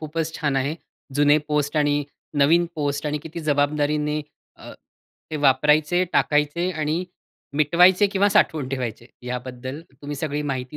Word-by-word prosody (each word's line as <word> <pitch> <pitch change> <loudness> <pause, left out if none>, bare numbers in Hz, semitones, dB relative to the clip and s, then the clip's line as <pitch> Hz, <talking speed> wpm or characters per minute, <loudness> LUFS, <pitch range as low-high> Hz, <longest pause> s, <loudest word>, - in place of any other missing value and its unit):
खूपच 160 +1 -3
छान 145 -3 -1
आहे. 140 +3 0 0.4
जुने 145 +1 +4
पोस्ट 150 0 0
आणि 145 -1 +2 0.4
नवीन 170 +4 +4
पोस्ट 145 -1 -2
आणि 150 0 -1
किती 165 +1 -7
जबाबदारीने 150 +1 +1 0.4
अ, - - -11 0.6
ते 155 - -2
वापरायचे, 150 +5 +3
टाकायचे 150 +5 +1
आणि 155 +2 -2 0.5
मिटवायचे 180 +6 +5
किंवा 200 0 +2
साठवून 160 -9 +2
ठेवायचे. 120 -3 -4 0.2
याबद्दल 125 +2 -6
तुम्ही 145 +2 -7
सगळी 150 0 -2
माहिती 130 +2 -6
150 Hz, 135 wpm, -23 LUFS, 140-160 Hz, 0.6 s, मिटवायचे